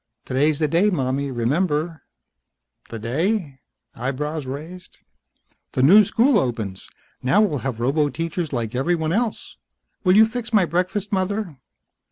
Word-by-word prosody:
"Today's 145 +3 +1
the 155 - +1
day, 170 +8 +3
mommy. 140 -5 -1
Remember?" 150 +6 -1 0.9
"The 115 - -6
day?" 145 - -2 0.3
Eyebrows 140 +4 -3
raised. 160 +7 -8 0.8
"The 130 - +1
new 200 +10 +8
school 230 +4 +3
opens. 110 - -4 0.3
Now 130 +11 +3
we'll 165 -10 +1
have 130 -3 -4
roboteachers 155 +5 -1
like 115 -3 -3
everyone 160 +4 0
else. 225 +1 -2 0.5
Will 185 0 +4
you 220 - +8
fix 230 +1 -5
my 210 -5 +4
breakfast, 185 +5 -2
mother?" 195 -3 -1
155 Hz, 130 wpm, -22 LUFS, 135-190 Hz, 0.9 s, new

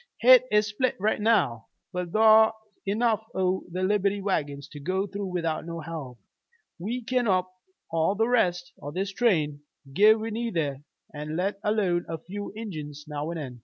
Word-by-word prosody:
Hit 255 +1 +8
is 210 0 +4
split 215 +5 -1
right 210 +2 0
now. 190 - +2 0.3
But 180 -1 -3
thar's 220 +2 +6 0.3
enough 220 +1 +1
o' 185 0 0
the 185 +2 -2
Liberty 200 +1 +1
wagons 145 -8 -2
to 145 - -10
go 185 +6 -1
through 200 0 -5
without 165 -3 -2
no 170 0 -6
help. 150 -6 -7 0.6
We 235 +8 -3
kin 250 0 0
whup 185 -2 +1 0.4
all 165 +4 +1
the 225 +2 +2
rest 180 -8 +1
o' 145 - -5
this 190 +6 -3
train, 155 -11 +1 0.3
give 215 +6 +6
we 225 +1 -4
need 230 -2 -3
ter, 145 -5 -1 0.3
let 160 +7 -3
alone 195 -5 +1
a 165 - -3
few 200 +6 -7
Injuns 155 -9 -7
now 150 +1 -4
an' 170 - -4
then. 130 -6 -7
185 Hz, 170 wpm, -27 LUFS, 160-215 Hz, 0.6 s, Hit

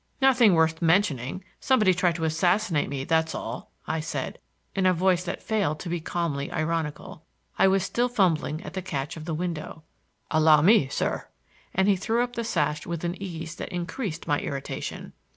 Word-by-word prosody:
"Nothing 250 -8 +5
worth 160 0 +2
mentioning. 165 - +1 0.2
Somebody 215 -8 +4
tried 175 -1 +1
to 165 - -4
assassinate 175 +2 +1
me, 135 -1 -3
that's 160 +2 +1
all," - - -6 0.2
I 160 - -1
said, 155 - -4 0.3
in 190 -1 +2
a 185 - +4
voice 180 0 +2
that - - -4
failed 200 -9 0
to 175 - -5
be 175 0 -1
calmly 155 -5 -2
ironical. 160 -1 -3 0.4
I - - +6
was 190 -1 +3
still 235 +6 0
fumbling 175 -8 +1
at - - -8
the 190 - -3
catch 145 -6 -4
of 155 -1 -8
the 160 -2 -2
window. 160 -2 -4 0.5
"Allow 155 -1 +5
me, 195 -6 +6
sir,"—and 190 +7 -3
he 200 - +5
threw 225 +5 +1
up 245 0 -5
the 235 - -2
sash 150 -7 -1
with 170 -1 -4
an 175 0 -1
ease 165 -4 -5
that - - -5
increased 180 +1 -4
my 145 - +1
irritation. 140 -1 -5
170 Hz, 180 wpm, -26 LUFS, 155-190 Hz, 0.5 s, I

